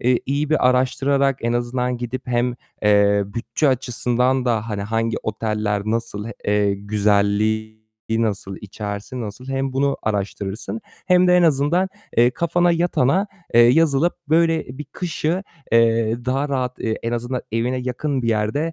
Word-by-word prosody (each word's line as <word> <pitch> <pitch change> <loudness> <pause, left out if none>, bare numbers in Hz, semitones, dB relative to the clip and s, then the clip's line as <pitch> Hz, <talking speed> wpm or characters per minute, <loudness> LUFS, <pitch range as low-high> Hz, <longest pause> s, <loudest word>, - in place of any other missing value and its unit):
eee, 125 0 +2
iyi 145 +2 -1
bir 155 -5 +3
araştırarak 135 +2 +2
en 120 0 0
azından 125 +1 -1
gidip 125 +2 -5
hem, 120 0 +1 0.3
eee, 100 -1 +4
bütçe 115 +8 -1
açısından 125 0 +1
da, 115 -2 0
hani, 100 -1 -2
hangi 115 +2 -1
oteller 105 -1 -1
nasıl, 115 -1 -2 0.2
eee, 105 -1 +2
güzelliği 105 +2 0 0.3
nasıl 105 -4 -1
içerisi, 105 +4 -6
nasıl 110 +3 -7
hem 135 0 -2
bunu 140 +1 +1
araştırırsın 100 0 -3 0.3
hem 180 -1 +5
de 180 - +6
en 180 - +4
azından, 160 +5 +2 0.3
eee, 120 +1 +6
kafana 170 +4 +1
yatana, 175 +1 +2 0.3
eee, 120 - +8
yazılıp 145 +5 +4
böyle 160 -5 +1
bir 150 - -5
kışı, 165 +4 -2 0.3
eee, 115 -1 +3
daha 135 +3 0
rahat, 130 -2 -2
eee, 110 -1 -1
en 115 - -2
azından 120 +2 -3
evine 120 +3 0
yakın 130 +2 -2
bir 115 - -1
yerde, 115 +10 0
120 Hz, 145 wpm, -21 LUFS, 110-140 Hz, 0.3 s, eee